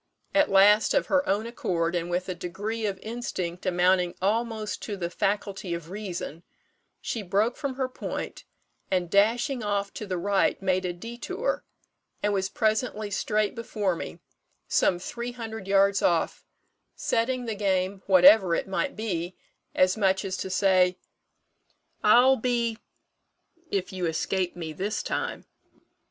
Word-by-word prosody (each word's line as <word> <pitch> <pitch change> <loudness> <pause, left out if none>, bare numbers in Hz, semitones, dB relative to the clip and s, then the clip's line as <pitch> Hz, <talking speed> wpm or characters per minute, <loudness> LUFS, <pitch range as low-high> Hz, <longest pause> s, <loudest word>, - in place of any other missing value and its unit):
At 295 +1 +4
last, 205 +2 +5
of - - +3
her 280 0 +3
own 205 +3 +1
accord, 175 -8 -1
and 175 -1 -2
with 180 +1 -1
a 185 - -2
degree 205 +6 -3
of 195 -2 -3
instinct 190 -6 -4
amounting 180 0 +2
almost 220 +2 -1
to 205 -2 -5
the 170 -2 -3
faculty 195 -2 -1
of 170 0 -8
reason, 185 -5 -5 0.6
she 230 - -3
broke 205 +5 +1
from 280 -3 -4
her 260 -1 -1
point, 255 - -6 0.5
and 180 -2 0
dashing 235 +6 +2
off 200 -1 -1
to 210 - -6
the 185 -2 -2
right 195 +2 +1
made 185 -1 0
a 180 - -1
détour, 245 - -3 0.6
and 205 0 +2
was 190 -1 0
presently 215 -1 0
straight 210 +1 0
before 210 -5 -2
me, 80 - -6 0.5
some 180 - +3
three 235 +6 -5
hundred 225 -4 -7
yards 195 0 +4
off, 170 -2 +1 0.5
setting 245 +2 0
the 225 - -2
game 195 -1 0
whatever 185 -1 +7
it - - -2
might 275 +9 -1
be, 185 -5 -3 0.4
as 185 0 +4
much 195 -1 +2
as 190 -1 -2
to 190 - -4
say, 185 -1 +3 1.1
'I'll 250 +5 +6
be 235 -1 0 0.9
if 195 -1 -2
you 180 -2 -1
escape 175 +3 -1
me 165 -3 -5
this 205 +6 -2
time.' - - -3
200 Hz, 145 wpm, -27 LUFS, 185-225 Hz, 1.1 s, whatever